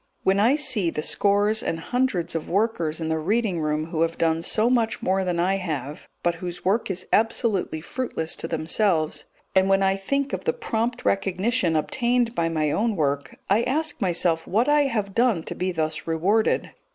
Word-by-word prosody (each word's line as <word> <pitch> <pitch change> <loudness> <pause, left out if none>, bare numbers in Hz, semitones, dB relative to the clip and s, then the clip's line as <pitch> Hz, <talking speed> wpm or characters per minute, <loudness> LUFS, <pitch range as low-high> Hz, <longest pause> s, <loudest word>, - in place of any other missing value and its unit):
When 190 +1 +3
I 235 +7 +4
see 255 - +2
the 150 -2 -4
scores 205 +4 +2
and 165 - -2
hundreds 245 -3 -1
of 165 -1 -4
workers 175 -6 0
in 160 -1 -3
the 160 0 0
reading 195 0 0
room 155 +1 -2
who 160 - -1
have 165 0 0
done 165 0 +1
so 215 +6 +2
much 235 -2 +1
more 190 +1 +1
than 180 -2 -1
I 190 +3 +2
have, 150 -6 -5 0.2
but 175 - +2
whose 175 -1 -6
work 205 +4 +1
is 185 -1 -4
absolutely 215 -7 +1
fruitless 165 -6 -3
to - - -4
themselves, 165 0 0 0.3
and 190 0 +3
when 195 0 +3
I 195 0 +3
think 275 +8 -2
of - - -4
the 475 - +2
prompt 235 - -3
recognition 195 -1 +1
obtained 240 +8 +1
by 165 -4 0
my 155 -2 0
own 220 +5 0
work, 140 -4 -1
I 205 +4 +3
ask 295 +5 -1
myself 170 -3 +1
what 225 +7 +1
I 295 0 +4
have 210 -7 -2
done 230 -8 +2
to - - -5
be 185 +1 -2
thus 155 -2 -3
rewarded. 185 +7 +1
190 Hz, 190 wpm, -24 LUFS, 165-225 Hz, 0.3 s, I